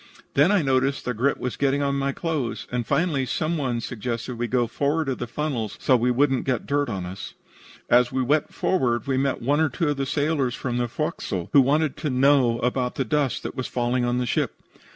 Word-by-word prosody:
Then 145 +7 +4
I 200 -5 +3
noticed 135 0 +1
that 125 - -1
grit 130 +5 +1
was 125 - -3
getting 140 0 +1
on 140 0 +1
my 140 0 0
clothes, 135 -10 -3
and 120 -2 -2
finally 160 -6 +1
some 160 +6 -1
one 130 -6 -1
suggested 120 +1 -4
that - - -5
we 120 +1 -1
go 125 0 +1
forward 145 +6 -1
of 130 - -2
the 120 - -3
funnels, 120 -4 -3
so 130 - +3
we 125 +1 +2
would 135 +3 +3
not 130 - 0
get 125 -4 -1
dirt 145 -2 0
on 95 -5 -3
us. 95 +3 -8 0.5
As 120 0 +4
we 130 0 0
went 145 +4 +1
forward 125 -10 0
we 135 -1 0
met 135 -2 0
one 145 +4 +2
or 160 -1 +3
two 150 +4 -1
of 145 - -1
the 135 -1 -2
sailors 145 -3 0
from 120 -2 -3
the 120 - 0
forecastle, 90 -5 -3
who 140 - +8
wanted 145 +2 +1
to 150 - -2
know 130 -2 +3
about 125 0 0
the 135 - -1
dust 140 +1 0
that - - -4
was 130 - -4
falling 120 0 0
on 120 0 0
the 125 - 0
ship. - - -1
130 Hz, 235 wpm, -24 LUFS, 120-145 Hz, 0.5 s, who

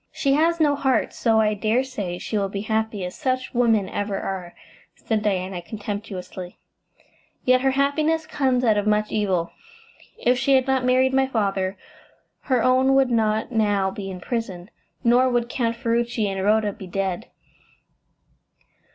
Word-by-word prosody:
"She 275 -1 +1
has 330 +3 +2
no 295 -2 +3
heart, 265 -4 0
so 225 -2 +2
I 215 -1 +3
dare 220 +5 +1
say 205 -9 -5
she 215 - -5
will 200 -2 0
be 200 0 -4
happy 220 -2 -1
as 180 - -6
such 255 -2 -2
women 225 -5 +2
ever 200 0 -3
are," 185 -3 -5 0.4
said 220 -2 -2
Diana 185 -3 -1
contemptuously, 200 -2 -7 0.9
"yet 255 0 +4
her 270 - +3
happiness 310 +3 +1
comes 260 -5 0
out 220 -3 +3
of 205 0 0
much 210 0 +1
evil. 185 -5 0 0.7
If 250 +1 +2
she 270 +2 +3
had 260 -1 +3
not 265 -1 +1
married 255 +1 +3
my 265 0 +3
father, 195 -5 -1 0.7
her 255 -4 +2
own 260 +1 +4
would 270 -2 +3
not 220 0 +1
now 205 -4 +1
be 195 0 -6
in 185 -1 -7
prison, 195 -3 -4 0.3
nor 245 +2 +4
would 240 -1 0
Count 235 -2 -1
Ferruci 235 -1 0
and 195 -1 -3
Rhoda 210 0 +2
be 190 - -10
dead." 195 +3 -3
220 Hz, 160 wpm, -23 LUFS, 200-255 Hz, 0.9 s, yet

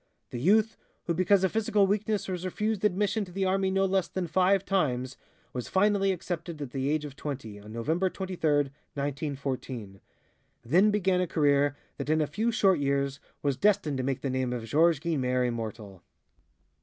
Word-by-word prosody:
The 120 - -4
youth, 215 - +3 0.3
who 170 - -1
because 185 +3 +3
of 190 - +2
physical 210 -2 +2
weakness 210 +1 0
was 180 -2 -4
refused 210 +3 -2
admission 210 +2 +1
to 180 - -13
the 190 +2 -1
army 190 0 +1
no 195 0 +2
less 190 -1 +1
than 185 -1 -3
five 185 +3 +2
times, 130 -9 0 0.4
was 125 -3 -4
finally 195 0 +2
accepted 170 -2 -4
at 140 -4 -5
the 135 +1 -1
age 150 0 0
of 140 -2 -8
twenty, 130 -9 -6
on 105 +1 -12
November 160 +12 0
23, 190 -1 -6 0.2
1914. 140 -6 -4 0.6
Then 180 - +4
began 190 -3 +2
a 180 - 0
career 145 -2 +2 0.2
that - - -5
in 155 0 +3
a 155 - +2
few 215 +11 -1
short 195 -6 +3
years 140 0 0 0.2
was 140 -3 0
destined 190 -4 +2
to 130 - -2
make 135 0 -2
the 135 - -2
name 130 -1 -1
of 120 -2 -4
Georges 160 +6 +3
Guynemer 130 -6 0
immortal. 110 -5 -5
160 Hz, 180 wpm, -28 LUFS, 135-190 Hz, 0.6 s, Then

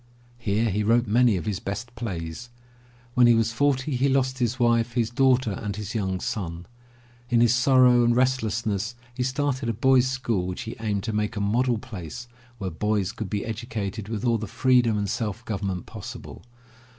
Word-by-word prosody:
Here 110 0 0
he 105 +3 0
wrote 115 +3 +3
many 115 -1 +3
of 90 - -5
his 105 -4 -2
best 115 +5 -5
plays. 100 -2 -5 0.6
When 125 -1 +5
he 120 - +6
was 115 0 +2
forty 135 +2 +1
he 135 +3 +2
lost 130 -1 +1
his 125 +1 0
wife, 120 -1 +2
his 115 -1 0
daughter 130 -2 +3
and 100 0 -4
his 105 0 -5
young 95 -4 -1
son. 85 -4 -4 0.6
In 120 -2 +3
his 120 0 +5
sorrow 125 -1 +5
and 120 0 +3
restlessness 115 -4 0 0.2
he 125 - -4
started 130 -1 -1
a - - 0
boy's 130 +3 +4
school 120 -8 -1
which 90 +8 -4
he 115 0 -6
aimed 105 -3 -1
to 110 -1 -3
make 105 0 -1
a - - -2
model 120 +4 +1
place 110 -1 -8 0.3
where 95 -4 -4
boys 105 +2 0
could 110 -4 -6
be 100 +1 -2
educated 110 -2 -4
with 115 +1 -3
all 115 -2 +2
the 110 - -5
freedom 125 0 +3
and 100 -1 -1
self 110 +2 -3
government 100 -4 -3
possible. - - -9
115 Hz, 185 wpm, -25 LUFS, 105-125 Hz, 0.6 s, he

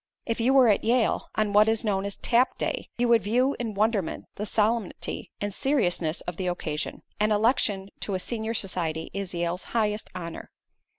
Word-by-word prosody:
If 230 0 -2
you 235 +3 +3
were 260 -3 +7
at 210 - +3
Yale, 235 0 +2
on 215 -2 +1
what 210 +1 +6
is 225 0 +1
known 195 -2 0
as 200 - -4
"Tap 245 +2 +2
Day," - - -2
you 245 0 +2
would 230 -2 +5
view 250 +7 +2
in 225 -4 -3
wonderment 210 -4 0
the 210 - -3
solemnity 220 -1 -1
and 205 -1 -3
seriousness 180 - 0
of 175 -2 -6
the 185 - -2
occasion. 160 -4 -3 0.2
An 210 +1 +2
election 210 -3 +2
to 200 - -2
a - - -1
senior 225 +2 -3
society 165 -6 -2
is 195 -2 -4
Yale's 170 +1 -1 0.2
highest 210 -1 0
honor. 170 -2 -6
210 Hz, 185 wpm, -27 LUFS, 185-230 Hz, 0.2 s, were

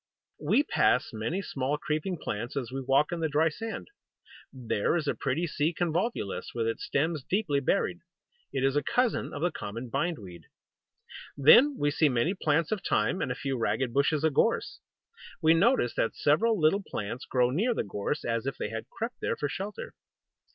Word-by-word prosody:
We - - +3
pass - - +2
many 135 - -2
small 140 -1 -2
creeping 155 +5 -2
plants 120 -4 -4
as 125 -3 -3
we 135 +1 -3
walk 135 +3 +2
in 175 - -2
the 160 -1 0
dry 155 +2 +3
sand. 225 +8 -6 0.6
There 120 -1 -1
is 160 -4 -1
a - - +2
pretty 140 +6 -1
Sea 155 +1 -1
Convolvulus, 175 - -2
with 115 -1 0
its 115 0 -2
stems 155 0 -1
deeply 175 -5 0
buried. 175 +5 0 0.5
It 135 - -1
is 135 +1 +2
a 145 - +3
cousin 245 - 0
of 145 - -5
the 175 - +2
common 115 0 -6
Bindweed. 100 - -3 0.9
Then 245 - +7
we 145 0 +1
see 155 0 +3
many 125 +8 +1
plants 160 -4 0
of 215 -3 -1
Thyme, 105 - 0
and 125 - -1
a - - -2
few 135 -2 -3
ragged 120 +2 0
bushes 140 +3 +2
of 160 -2 +2
Gorse. 225 +11 +1 0.6
We 160 -2 +5
notice 170 - +3
that 115 - -1
several 210 +9 +2
little 160 +6 +3
plants 115 - -5
grow 125 -1 +2
near 220 - +1
the - - 0
Gorse, 100 +9 -3
as 115 +2 -1
if 135 - -3
they - - -3
had 115 0 -6
crept 230 +2 -5
there - - 0
for 145 - -2
shelter. 195 +7 -6
145 Hz, 185 wpm, -28 LUFS, 125-175 Hz, 0.9 s, Then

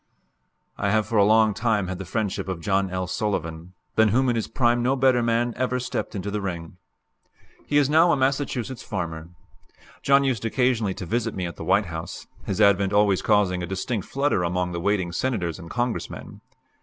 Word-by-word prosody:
I 100 - 0
have 110 +1 +2
for 110 +2 +1
a - - +6
long 110 +1 +4
time 110 -4 0
had 95 0 -5
the 95 - -5
friendship 105 -5 -2
of 95 -3 -3
John 95 +3 0
L. 95 0 -2
Sullivan, 90 -4 -3 0.2
than 110 0 +4
whom 125 +5 +2
in 120 - +1
his 115 - -1
prime 120 -2 +1
no 130 +3 +2
better 130 -2 +3
man 115 +1 +1
ever 125 0 -1
stepped 125 -2 -4
into 100 +1 -4
the 105 0 -2
ring. 85 -3 -5 0.9
He 145 - +2
is 145 -2 +4
now 160 +4 +5
a - - +2
Massachusetts 130 -2 -1
farmer. 85 -4 -5 0.7
John 140 0 +4
used 130 -6 -1
occasionally 115 -4 +1
to 100 - -6
visit 115 +4 -1
me 95 - -2
at 85 - -6
the - - -6
White 100 +6 +2
House, 80 -1 -7 0.2
his 100 - -2
advent 100 -1 +4
always 100 -2 +3
causing 100 -4 +2
a 90 - -4
distinct 95 +3 -3
flutter 140 -7 0
among 90 +1 -1
the 85 -1 -4
waiting 95 -2 0
Senators 90 -6 -2
and 85 -2 -10
Congressmen. 120 -1 -4
105 Hz, 195 wpm, -24 LUFS, 90-120 Hz, 0.9 s, a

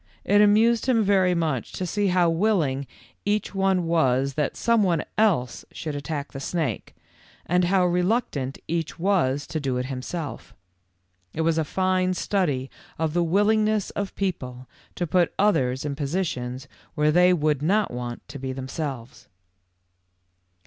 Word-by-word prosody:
It 205 +2 +4
amused 220 +4 +4
him 235 -4 +3
very 190 -3 +3
much 155 -8 -2
to 185 - -3
see 205 +3 0
how 180 -2 +3
willing 165 -7 +1 0.4
each 210 +1 -1
one 190 -2 +1
was 140 -5 +2
that 150 0 -2
some 235 -1 +2
one 175 -5 +1
else 185 - +1
should 155 -2 -5
attack 145 +1 -4
the 135 - -7
snake, 140 - -3 0.5
and 180 +1 +2
how 185 0 +3
reluctant 180 - 0
each 165 -1 -2
was 165 -7 +1
to 155 - -4
do 135 -3 -1
it 125 - -2
himself. 135 +5 -6 0.8
It 160 - -1
was 165 0 +2
a - - +2
fine 185 +2 0
study 145 -11 -1 0.3
of 160 -1 -1
the 175 0 +2
willingness 210 +4 +2
of 200 -1 -4
people 130 -10 -4 0.3
to 175 - -1
put 175 +1 +1
others 135 -10 +1
in 145 -1 -2
positions 140 -4 -3 0.3
where 150 0 +3
they 180 +3 +5
would 150 -5 +1
not 200 +7 +1
want 120 -1 -6
to 140 0 -8
be 130 0 -4
themselves. 130 -3 -6
165 Hz, 150 wpm, -25 LUFS, 135-190 Hz, 0.8 s, they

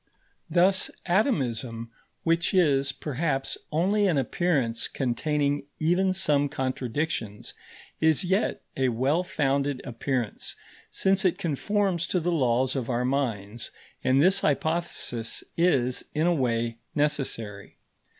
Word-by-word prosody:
Thus 185 +3 +3 0.2
atomism, 125 - 0 0.3
which 165 +3 +1
is, 140 -6 +3
perhaps, 135 0 -2 0.2
only 195 +6 +2
an 170 -6 +2
appearance 135 -4 0
containing 145 +2 -1
even 180 +4 +2
some 145 -6 +2
contradictions, 130 -4 -3 0.5
is 160 0 +3
yet 190 +4 0
a 130 -1 +2
well 135 +9 +1
founded 140 -4 0
appearance, 125 -1 -2 0.3
since 195 +1 +2
it 185 - +2
conforms 185 +3 0
to 180 - +1
the 175 +1 0
laws 130 -4 +2
of 130 -3 -2
our 125 0 0
minds; 120 -4 -2 0.3
and 130 +1 +3
this 190 +3 +5
hypothesis 150 -7 -1
is, 135 -8 +2
in 155 +2 +2
a 175 - +4
way, 115 -5 0 0.2
necessary. 130 -9 -2
140 Hz, 115 wpm, -27 LUFS, 125-170 Hz, 0.5 s, this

